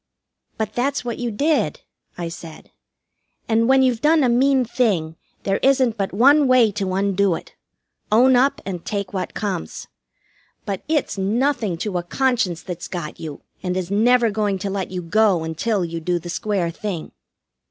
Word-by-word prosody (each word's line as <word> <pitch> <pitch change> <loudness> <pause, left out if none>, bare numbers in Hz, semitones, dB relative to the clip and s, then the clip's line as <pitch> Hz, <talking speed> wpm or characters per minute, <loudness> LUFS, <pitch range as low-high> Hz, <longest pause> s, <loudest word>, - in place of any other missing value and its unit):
"But 215 -1 -3
that's 265 +1 -1
what 235 -2 -4
you 240 -1 -2
did," 230 - 0 0.4
I 175 -1 -3
said. 165 -1 -10 0.8
"And 230 +1 +2
when 265 0 +5
you've 245 -3 +1
done 310 0 +4
a 250 - +3
mean 260 +2 +3
thing, 200 -10 0 0.3
there 195 0 +1
isn't 260 -4 +2
but 195 -3 -2
one 275 +8 +5
way 250 -4 +5
to 195 -2 -2
undo 195 -2 +2
it - - -10 0.6
own 250 +4 +5
up 265 +3 +2
and 180 -4 -5
take 200 -2 -4
what 190 - -4
comes. 200 - -4 0.8
But 195 -2 -3
it's 300 -9 -1
nothing 220 -1 0
to 190 -4 -1
a - - -5
conscience 220 -4 0
that's 175 -2 -6
got 170 -4 -6
you, 155 -3 -7 0.2
and 180 0 -2
is 185 0 -3
never 235 +2 +3
going 205 -1 0
to 195 - -1
let 195 -1 -3
you 180 -1 -5
go 195 -1 +2
until 175 +5 -1
you 165 0 -5
do 175 +2 -1
the 175 +1 -8
square 195 -5 -1
thing. 190 -3 -5
205 Hz, 175 wpm, -21 LUFS, 180-245 Hz, 0.8 s, when